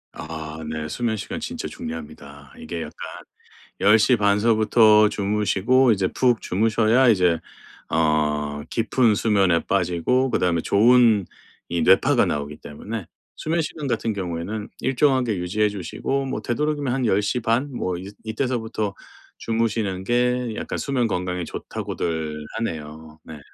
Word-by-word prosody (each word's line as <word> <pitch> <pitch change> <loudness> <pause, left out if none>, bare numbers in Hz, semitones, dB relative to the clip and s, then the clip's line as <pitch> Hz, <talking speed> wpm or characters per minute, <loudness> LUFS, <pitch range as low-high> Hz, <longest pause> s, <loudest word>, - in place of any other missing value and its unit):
아 80 0 -7
네. 80 0 -4
수면 115 +3 -1
시간 250 - -5
진짜 245 +1 -5
중요합니다. 75 - -9
이게 80 +1 -5
약간 - - -8 0.9
10:30 105 -1 +4
서부터 110 -1 +5
주무시고 105 +5 +2
이제 95 -3 +1
푹 120 -3 +1
주무셔야 115 +5 +2
이제 90 -6 +3 0.5
어 75 -2 0
깊은 115 -1 +2
수면에 100 -6 +3
빠지고 100 +8 +1
그다음에 85 -6 +1
좋은 115 -1 +4 0.4
이 85 -1 -1
뇌파가 95 +3 +4
나오기 75 0 -3
때문에 100 +6 -7 0.3
수면 165 +1 -1
시간 150 -2 -5
같은 115 -2 -1
경우에는 95 +3 -4
일정하게 130 -5 +2
유지해 100 +5 0
주시고 105 +8 -3
뭐 120 -5 -3
되도록이면 145 +2 -1
한 130 -2 0
"10:30 115 +7 0
뭐 90 -6 -2
이 95 +3 -8
이때서부터 110 -3 -2 0.5
주무시는 110 -4 -1
게 125 +1 0
약간 - - -4
수면 130 -4 0
건강에 90 -2 -2
좋다."고들 80 -2 -4
하네요. 80 -6 -6
네. 80 - -10
105 Hz, 285 characters per minute, -23 LUFS, 85-120 Hz, 0.9 s, 서부터